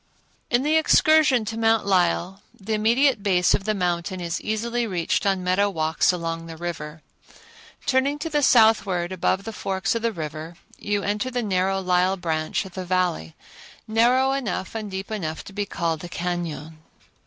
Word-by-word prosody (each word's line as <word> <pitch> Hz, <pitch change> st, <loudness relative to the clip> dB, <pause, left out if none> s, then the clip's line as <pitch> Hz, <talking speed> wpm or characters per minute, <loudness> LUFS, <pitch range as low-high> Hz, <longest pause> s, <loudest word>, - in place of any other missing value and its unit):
In 245 Hz, +1 st, +2 dB
the 310 Hz, +2 st, +3 dB
excursion 310 Hz, -6 st, +4 dB
to 225 Hz, +1 st, -4 dB
Mount 225 Hz, -1 st, +2 dB
Lyell 185 Hz, 0 st, +1 dB, 0.2 s
the 215 Hz, +2 st, -4 dB
immediate 235 Hz, +3 st, +2 dB
base 185 Hz, -3 st, +3 dB
of 195 Hz, -, 0 dB
the 215 Hz, 0 st, 0 dB
mountain 180 Hz, 0 st, -2 dB
is 170 Hz, 0 st, -3 dB
easily 235 Hz, +2 st, -2 dB
reached 180 Hz, 0 st, -1 dB
on 190 Hz, -2 st, +1 dB
meadow 185 Hz, +3 st, +2 dB
walks 160 Hz, -2 st, +1 dB
along 165 Hz, -2 st, -4 dB
the 165 Hz, -1 st, -9 dB
river. 160 Hz, -2 st, -6 dB, 0.8 s
Turning 280 Hz, +1 st, +1 dB
to 295 Hz, -, -4 dB
the 295 Hz, -2 st, 0 dB
southward 205 Hz, -8 st, +4 dB
above 185 Hz, +1 st, 0 dB
the 225 Hz, -, -6 dB
forks 190 Hz, -2 st, -2 dB
of 230 Hz, -, -2 dB
the 230 Hz, 0 st, 0 dB
river, 160 Hz, -2 st, -6 dB, 0.2 s
you 205 Hz, -1 st, -1 dB
enter 210 Hz, +5 st, -1 dB
the 245 Hz, -1 st, -2 dB
narrow 195 Hz, -1 st, 0 dB
Lyell 185 Hz, +1 st, +1 dB
branch 160 Hz, 0 st, -2 dB
of 190 Hz, -, -11 dB
the 185 Hz, -, -5 dB
Valley, 180 Hz, -, -1 dB, 0.5 s
narrow 245 Hz, +4 st, +3 dB
enough 230 Hz, -9 st, -3 dB
and 220 Hz, -2 st, -5 dB
deep 190 Hz, +2 st, -6 dB
enough 160 Hz, -7 st, -4 dB
to 195 Hz, -, -12 dB
be 205 Hz, 0 st, -3 dB
called 165 Hz, -4 st, -2 dB
a 175 Hz, -, -7 dB
cañon. 170 Hz, -3 st, -4 dB
195 Hz, 175 wpm, -24 LUFS, 175-225 Hz, 0.8 s, excursion